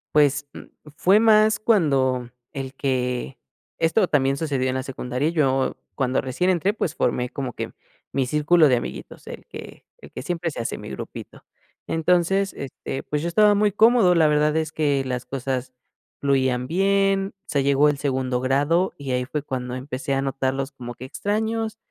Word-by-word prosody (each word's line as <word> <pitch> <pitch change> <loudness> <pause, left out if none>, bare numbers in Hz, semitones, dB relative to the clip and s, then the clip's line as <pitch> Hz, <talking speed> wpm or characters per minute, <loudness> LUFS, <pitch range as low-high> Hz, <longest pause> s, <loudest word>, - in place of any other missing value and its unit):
Pues, 145 -1 +3
mm, - - -9 0.4
fue 195 +3 +5
más 215 -1 +5
cuando 135 - +2 0.2
el 135 -3 -6
que 125 -2 -2 0.4
esto 165 +5 +2
también 135 -3 +1
sucedió 140 -5 -1
en 130 - -2
la 130 - -2
secundaria, 130 +2 -2
yo 135 -5 +1 0.2
cuando 130 -2 0
recién 135 +8 -1
entré, 185 +3 +2
pues, 180 -7 -3
formé 125 0 0
como 130 -2 -5
que - - -5 0.4
mi 135 -1 0
círculo 150 +4 +4
de 130 - +4
amiguitos, 120 - -7
el - - -9
que - - -11
el - - -14
que - - -7
siempre 170 +2 -2
se 145 - -5
hace, 115 - -3
mi - - -8
grupito. - - -8 0.4
Entonces, 180 +4 +1
este, 135 0 -6
pues 150 0 -2
yo 170 - -2
estaba 210 +5 +5
muy 205 0 +2
cómodo, 220 -3 +5
la 160 -2 +5
verdad 150 +1 +2
es 160 -1 -1
que 145 -4 +1
las 125 -1 -3
cosas 130 0 -4 0.5
fluían 130 -3 +1
bien, 195 +2 +1
se 140 - 0
llegó 140 +1 +4
el 145 - -1
segundo 130 -3 -1
grado 145 +8 +1
y 140 -2 -5
ahí 125 0 0
fue 150 +2 -4
cuando 125 -2 -4
empecé 130 +1 -4
a 135 - +1
notarlos 135 0 -2
como 120 -3 -8
que 125 +2 -9
extraños 220 +6 -2
140 Hz, 175 wpm, -23 LUFS, 130-175 Hz, 0.5 s, fue